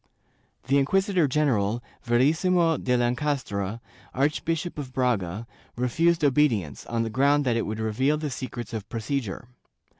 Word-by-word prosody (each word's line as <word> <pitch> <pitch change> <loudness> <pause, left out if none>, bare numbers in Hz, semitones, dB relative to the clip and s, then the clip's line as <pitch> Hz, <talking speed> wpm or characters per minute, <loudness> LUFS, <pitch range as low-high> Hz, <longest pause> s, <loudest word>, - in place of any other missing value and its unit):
The 140 +3 +3
inquisitor 185 +3 +2
general, 120 -6 +1 0.2
Verissimo 160 +7 +3
de 125 -1 +1
Lencastre, 120 -5 -1 0.4
Archbishop 155 +4 -1
of 135 -3 -6
Braga, 115 -6 -1 0.3
refused 165 +7 +2
obedience, 125 - +1
on 115 -1 0
the 115 - -3
ground 140 +4 +3
that 120 -2 +2
it 115 - -1
would 110 +1 -4
reveal 130 +7 +1
the 150 -2 -3
secrets 120 -3 -6
of 110 -2 -5
procedure. 115 -1 -3
130 Hz, 130 wpm, -26 LUFS, 115-150 Hz, 0.4 s, The